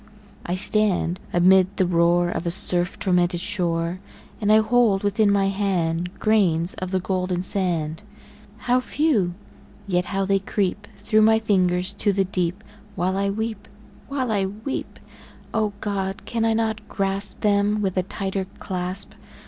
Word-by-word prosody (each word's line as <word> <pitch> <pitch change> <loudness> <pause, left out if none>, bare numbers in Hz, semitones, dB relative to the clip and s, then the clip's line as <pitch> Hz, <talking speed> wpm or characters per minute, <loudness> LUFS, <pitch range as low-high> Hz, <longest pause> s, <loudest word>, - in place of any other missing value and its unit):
I 175 - -1
stand 190 -3 +2
amid 185 +2 +4
the 185 - +3
roar 175 0 +3
Of 170 - -3
a - - +2
surf 175 +1 +2
tormented 180 -2 +1
shore, 175 -3 -1 0.4
And 210 0 +2
I 215 - +7
hold 220 -3 +3
within 205 +1 +2
my 195 -1 +2
hand 180 -3 -1
Grains 185 -6 +2
of 185 - -5
the 190 0 0
golden 185 -1 -2
sand 170 -5 0 0.6
How 250 +1 +3
few! 255 - 0 0.5
yet 180 -2 0
how 195 0 -1
they 195 0 +2
creep 200 +1 -2
Through 215 -1 +2
my 220 +1 +5
fingers 185 -3 +1
to 205 0 0
the 195 0 +1
deep 180 +1 -2 0.3
While 185 +1 0
I 200 0 0
weep 220 0 -4 0.4
while 265 -4 -2
I 195 -3 +1
weep! 215 +7 -6 0.5
O 215 -2 +1
God! 195 -2 -3
can 230 -1 -1
I 225 - +2
not 220 -1 -2
grasp 195 0 -2
Them 205 0 +2
with 190 -2 -1
a 185 - +2
tighter 195 +1 -4
clasp? 185 +1 -5
195 Hz, 155 wpm, -23 LUFS, 180-210 Hz, 0.6 s, I